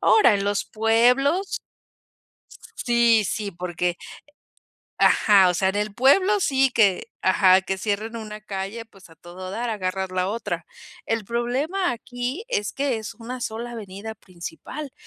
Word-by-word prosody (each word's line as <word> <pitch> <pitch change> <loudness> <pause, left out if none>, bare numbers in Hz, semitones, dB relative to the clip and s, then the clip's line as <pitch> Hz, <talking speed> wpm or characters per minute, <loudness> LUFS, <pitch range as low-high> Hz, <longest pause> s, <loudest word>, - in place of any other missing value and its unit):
Ahora, 330 - +5
en 200 0 -1
los 205 0 0
pueblos 250 - +2 1.1
Sí, 235 -3 +3
sí, 205 +2 -3
porque 175 0 -2 1.0
Ajá, 195 -3 +5
o - - -1
sea, 190 +3 +2
en 195 - -5
el 210 0 -2
pueblo 370 - +4
sí 270 -5 +3
que 205 -1 +2
ajá, 190 0 +5
que 190 +1 -2
cierren 215 +3 -2
una 215 -1 -7
calle, 205 +2 -5
pues, 195 -5 -18
a - - -16
todo 185 +2 -9
dar, 235 +4 -3
agarras 190 -2 -2
la 185 0 0
otra. 230 +3 -3 0.4
El 225 -2 -1
problema 265 - -1
aquí, 245 - -5
es 205 - -1
que 275 -3 -1
es 220 0 -6
una 245 +2 -7
sola 235 +2 -4
avenida 215 0 -7
principal, 195 - -8
220 Hz, 145 wpm, -24 LUFS, 190-245 Hz, 1.1 s, Ahora